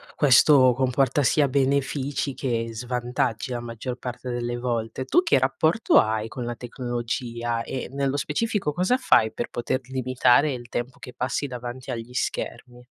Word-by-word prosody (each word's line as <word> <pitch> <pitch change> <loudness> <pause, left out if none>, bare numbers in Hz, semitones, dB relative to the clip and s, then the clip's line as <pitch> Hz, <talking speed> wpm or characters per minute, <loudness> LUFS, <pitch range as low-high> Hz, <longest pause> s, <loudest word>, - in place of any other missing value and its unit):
questo 130 -2 +6
comporta 135 +2 +1
sia 145 +2 +3
benefici 140 +1 0
che 115 -3 -2
svantaggi 125 +1 -2
la 120 -1 -3
maggior 120 +2 -5
parte 125 0 -6
delle 120 0 -2
volte. 120 +1 -3
Tu 355 - +4
che 340 - +3
rapporto 160 - +2
hai 110 0 0
con 125 +2 -6
la 120 0 -4
tecnologia 120 -1 -3
e, 130 - -5
nello 140 0 -1
specifico, 195 +2 -1
cosa 185 - +2
fai 110 - +3
per 120 - -4
poter 120 +2 -2
limitare 130 +2 +2
il 120 -2 -6
tempo 125 +2 -4
che 125 - -10
passi 135 +3 -2
davanti 125 0 -6
agli 120 +1 -6
schermi? 125 0 -4
125 Hz, 155 wpm, -25 LUFS, 120-135 Hz, -, questo